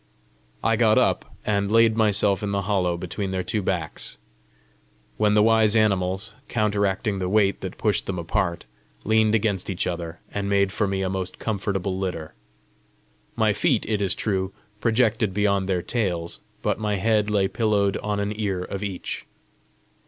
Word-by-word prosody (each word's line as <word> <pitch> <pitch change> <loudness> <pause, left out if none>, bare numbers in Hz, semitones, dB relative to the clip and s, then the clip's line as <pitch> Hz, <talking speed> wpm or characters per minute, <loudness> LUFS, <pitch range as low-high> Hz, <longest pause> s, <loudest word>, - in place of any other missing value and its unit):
I - - +2
got - - +4
up, - - +1
and 100 -1 0
laid 115 0 +5
myself 105 -3 +2
in 105 -1 -2
the 100 0 0
hollow 90 -3 0
between 90 +3 -4
their 95 -1 -2
two 105 +2 -1
backs; 90 -4 -2 1.0
when 105 -1 +3
the 105 - +5
wise 110 -1 +4
animals, 100 -1 +1 0.2
counteracting 100 -2 0
the 90 -1 -1
weight 100 -1 +2
that 95 -1 -6
pushed 105 -2 0
them 95 - -2
apart, 85 +1 -1 0.4
leaned 110 0 +3
against 100 -4 0
each 95 - -1
other, 85 -1 -4
and 100 -1 -2
made 100 -1 +2
for 105 - 0
me 95 0 -1
a - - 0
most 95 -1 -4
comfortable 100 -3 -2
litter. 90 -5 -4 1.0
My - - +3
feet, - - +1
it 105 -1 0
is 95 -4 +1
true, 95 -3 -1 0.3
projected 110 -4 +1
beyond 100 -2 +1
their 90 -2 0
tails, 90 -8 -1 0.2
but - - 0
my 105 -1 0
head 105 +1 +2
lay 100 -2 +2
pillowed 100 -1 +1
on 105 -1 -2
an 100 +1 -1
ear 100 -4 -2
of 100 +2 -5
each. 95 -3 -5
100 Hz, 165 wpm, -24 LUFS, 95-105 Hz, 1.0 s, laid